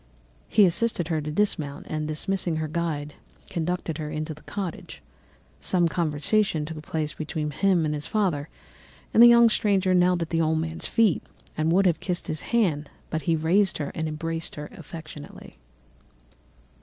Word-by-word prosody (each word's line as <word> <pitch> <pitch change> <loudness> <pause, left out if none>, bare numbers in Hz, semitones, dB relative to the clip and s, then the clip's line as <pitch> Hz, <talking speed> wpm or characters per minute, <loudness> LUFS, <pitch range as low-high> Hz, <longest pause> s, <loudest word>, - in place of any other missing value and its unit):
He 210 -2 +6
assisted 175 -1 0
her 160 -2 0
to 150 - -5
dismount, 150 -5 -1
and 155 -1 -3
dismissing 170 +2 -1
her 155 0 -2
guide, 150 -2 -3 0.4
conducted 170 -2 -2
her 150 -1 -4
into 155 +1 -4
the 155 - -15
cottage. 195 -5 -6 0.6
Some 175 -2 +2
conversation 165 +2 0
took 155 0 -7
place 155 0 -3
between 155 -1 -3
him 180 +1 +2
and 150 - 0
his 150 0 -4
father, 175 -9 0 0.6
and 230 - +6
the 240 - +11
young 235 0 +7
stranger 195 -4 +2
knelt 180 -1 +3
at 165 - -9
the 165 -1 +2
old 160 0 +2
man's 160 +1 -1
feet 220 -7 +3 0.3
and 155 +1 +1
would 195 +3 +4
have 175 -3 +3
kissed 180 -2 -3
his 155 - -3
hand, 170 -11 +1 0.2
but 160 - -1
he 165 - +4
raised 175 +4 +2
her 145 -2 -3
and 160 0 -2
embraced 165 +1 -4
her 150 0 -7
affectionately. 155 - -10
165 Hz, 170 wpm, -26 LUFS, 155-185 Hz, 0.6 s, the